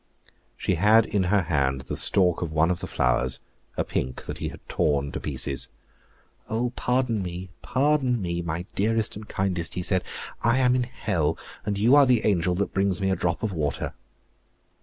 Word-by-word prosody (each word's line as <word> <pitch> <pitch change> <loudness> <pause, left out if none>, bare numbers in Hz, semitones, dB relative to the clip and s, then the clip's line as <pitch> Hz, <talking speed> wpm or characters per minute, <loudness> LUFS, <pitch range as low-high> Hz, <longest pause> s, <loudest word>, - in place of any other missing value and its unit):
She - - 0
had 110 +2 +6
in 100 -4 0
her 100 +1 +2
hand 70 -5 0
the 65 - -5
stalk 90 -3 +5
of 85 -3 -3
one 80 +2 +2
of 90 - -2
the - - -3
flowers, 65 0 +1 0.4
a - - +1
pink, 65 0 -3
that - - -6
he - - -3
had - - -10
torn 70 -2 0
to - - -4
pieces. 65 -2 -2 0.8
"Oh, 120 +2 -1
pardon 125 -3 0
me, 90 0 -6
pardon 135 -3 +1
me, 85 -3 -2
my 85 +1 -4
dearest 110 +2 0
and 105 +1 -9
kindest," 90 -3 -2
he 90 - -2
said; 95 0 +2 0.4
"I 115 +3 +3
am 125 -1 +4
in 125 -1 +1
hell, 105 - -1 0.3
and 100 -1 0
you 115 +6 +4
are 145 -2 +7
the 125 -3 +3
angel 90 -3 +2
that 100 +2 -2
brings 95 -1 +1
me 95 -1 0
a - - +2
drop 85 +1 -2
of 105 -3 -1
water." 75 -4 -2
95 Hz, 190 wpm, -25 LUFS, 85-110 Hz, 0.8 s, are